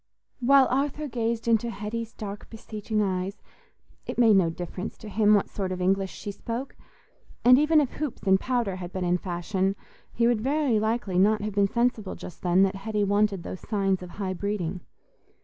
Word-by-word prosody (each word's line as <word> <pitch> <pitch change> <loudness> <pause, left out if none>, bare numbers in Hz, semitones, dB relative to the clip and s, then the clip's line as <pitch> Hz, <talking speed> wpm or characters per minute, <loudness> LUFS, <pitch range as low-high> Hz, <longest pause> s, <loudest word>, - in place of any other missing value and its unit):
While 270 +2 +6
Arthur 285 +3 -1
gazed 235 -2 -2
into 230 0 +2
Hetty's 225 +1 -5
dark 205 -2 -7
beseeching 215 -1 -3
eyes, 190 +1 -3 0.6
it - - -5
made 230 -3 +6
no 185 -4 +4
difference 175 +4 -6
to 220 - -11
him 210 0 +4
what 200 - +1
sort 190 -2 -4
of 185 - -3
English 190 +1 +1
she 205 - -6
spoke; 235 +6 -5 0.7
and 250 +2 +8
even 305 +1 +4
if 285 -4 0
hoops 295 -4 -5
and 190 -1 +4
powder 235 -7 -1
had 175 -1 -7
been 185 -1 -3
in 175 0 +2
fashion, 190 +2 -1 0.4
he 235 - +1
would 235 -2 +2
very 270 -3 +1
likely 220 -4 0
not 210 +2 +3
have 210 -1 -3
been 200 0 +3
sensible 235 -4 0
just 175 - -10
then 180 +1 +4
that 195 0 +1
Hetty 210 +1 -1
wanted 205 -2 +1
those 185 - -6
signs 195 -3 0
of 180 - -8
high 190 +1 -4
breeding. 185 -2 -3
210 Hz, 185 wpm, -26 LUFS, 190-235 Hz, 0.7 s, and